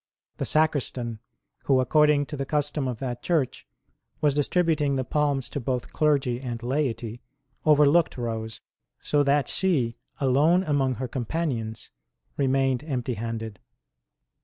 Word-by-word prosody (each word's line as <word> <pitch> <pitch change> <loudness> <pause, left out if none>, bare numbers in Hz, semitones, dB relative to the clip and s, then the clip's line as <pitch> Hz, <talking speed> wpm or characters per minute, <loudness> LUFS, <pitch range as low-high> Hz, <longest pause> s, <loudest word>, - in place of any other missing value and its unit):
The - - -2
Sacristan, 130 -7 0 0.5
who, 135 -2 +4
according 150 +2 +4
to 150 - -7
the 140 - -2
custom 145 -2 -1
of 125 -3 -3
that 120 0 -4
church, 155 - -1 0.5
was 150 -2 +3
distributing 150 -1 +1
the 130 - 0
palms 145 -1 0
to - - -3
both 125 -1 -3
clergy 135 -5 +1
and 120 -3 -5
laity, 120 -3 -2 0.4
overlooked 150 +1 +4
Rose, 110 -2 -4 0.4
so 145 - +1
that 140 -1 +2
she, 135 -12 0 0.2
alone 150 +7 +3
among 140 -5 +1
her 130 +1 -4
companions, 120 -3 -3 0.4
remained 135 -1 +1
empty 130 -5 -2
handed. 110 -2 -5
135 Hz, 130 wpm, -26 LUFS, 120-150 Hz, 0.5 s, who